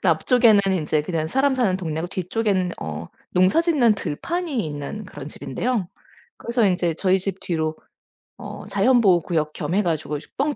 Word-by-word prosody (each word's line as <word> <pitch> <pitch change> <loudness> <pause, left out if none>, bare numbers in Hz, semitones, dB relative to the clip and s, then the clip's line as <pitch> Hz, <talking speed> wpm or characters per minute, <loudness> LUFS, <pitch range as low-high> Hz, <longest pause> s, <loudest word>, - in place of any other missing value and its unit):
앞쪽에는 235 -5 +5 0.2
이제 155 0 +1
그냥 155 0 -2
사람 270 - +2
사는 230 -8 +1
동네고 160 -1 -3
뒤쪽에는 185 -1 -1
어 80 +1 -5 0.2
농사짓는 240 - +3
들판이 275 - -3
있는 150 +8 -6
그런 145 -5 -9
집인데요. 225 - -2 0.5
그래서 235 -2 +1
인제 180 -3 +1
저희 190 -1 +3
집 190 0 -4
뒤로 160 -2 -2 0.6
어 - - -8
자연보호구역 190 -7 +2
겸 175 - -3
해 210 - +3
가지고 155 -3 -1 0.2
뻥 285 +2 0
190 Hz, 330 characters per minute, -23 LUFS, 160-235 Hz, 0.6 s, 앞쪽에는